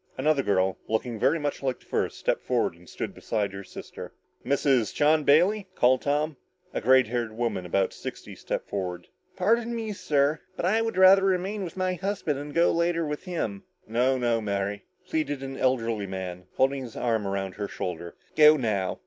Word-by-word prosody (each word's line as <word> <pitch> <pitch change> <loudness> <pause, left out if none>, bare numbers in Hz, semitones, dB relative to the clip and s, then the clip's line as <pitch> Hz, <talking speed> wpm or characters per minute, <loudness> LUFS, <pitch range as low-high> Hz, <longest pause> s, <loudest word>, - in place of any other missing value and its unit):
Another 155 -2 +2
girl, 95 -4 +1
looking 110 +1 -2
very 165 - +3
much 145 -2 -3
like 130 -2 -2
the - - -23
first, - - -1
stepped - - 0
forward - - 0
and 85 +1 -18
stood - - -5
beside 100 -3 -2
her 100 0 -7
sister. - - -9 0.3
"Mrs. 135 -5 +1
John 155 +1 +4
Bailey?" 185 +8 +4
called 125 +1 +4
Tom. 145 +1 0 0.4
A - - -2
gray 130 +2 +6
haired 120 -1 -3
woman 115 -7 -2
of - - -15
about 95 -1 +1
sixty - - -8
stepped - - -4
forward. 90 -3 -4 0.3
"Pardon 230 +5 +1
me, 220 -2 -3
sir, 150 -4 +1 0.2
but - - -2
I 215 +5 +3
would 225 -3 -2
rather 190 +1 +8
remain 195 +2 0
with 175 0 -7
my 185 0 0
husband, 180 -6 -2
and 145 +1 -7
go 170 +3 +3
later 170 0 +1
with 150 +4 -5
him." 185 +2 -3 0.3
"No 125 +4 +2
no, 120 -2 +1
Mary," 100 0 -2 0.2
pleaded 145 -4 -2
an 135 0 -5
elderly 115 -5 0
man, 90 -1 -6
holding 135 +1 +2
his 120 -3 -8
arm 110 -4 0
around 95 -1 -2
her 105 +1 -4
shoulder. 85 -3 -5 0.2
"Go 155 0 +8
now. 105 -8 -1
135 Hz, 190 wpm, -27 LUFS, 105-165 Hz, 0.4 s, rather